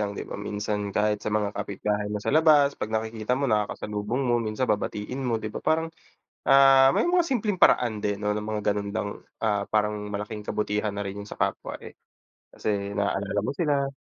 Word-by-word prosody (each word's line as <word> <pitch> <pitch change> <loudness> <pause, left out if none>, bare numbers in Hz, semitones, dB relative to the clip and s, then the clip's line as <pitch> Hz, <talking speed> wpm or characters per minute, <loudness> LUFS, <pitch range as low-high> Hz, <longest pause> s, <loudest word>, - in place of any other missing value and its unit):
lang, 100 -1 -2
'di - - -4
ba? - - -7
Minsan 105 0 -3
kahit 105 +1 0
sa - - -3
mga 105 -1 0
kapitbahay 105 +1 -2
mo 105 - -2
sa 105 - -2
labas, 150 -2 +5
'pag 105 - -5
nakikita 110 +2 -1
mo, 140 - -1
nakakasalubong 105 +1 -1
mo, 120 -1 +2
minsan 110 +2 -1
babatiin 105 +2 -2
mo, 125 -3 0
'di 110 -1 -5
ba? - - -5
Parang, 160 +1 0 0.6
ah, 135 -1 +7
may - - +3
mga 355 +1 +4
simpleng 210 -7 -1
paraan 110 -4 +4
din 105 -1 -1
'no, 105 0 -1
ng 105 - -2
mga 105 0 -3
ganun 100 0 -3
lang, 105 0 -2 0.3
ah, 105 -2 -1
parang 105 -1 0
malaking 105 +1 -5
kabutihan 105 0 -1
na 100 0 -4
rin 100 +1 -5
yun 100 - -10
sa - - -8
kapwa, - - -2
eh, - - -11 0.6
kasi 100 -1 -2
naalala 100 0 -1
mo 105 - -1
sila. 140 -4 +1
105 Hz, 200 wpm, -26 LUFS, 105-125 Hz, 0.6 s, ah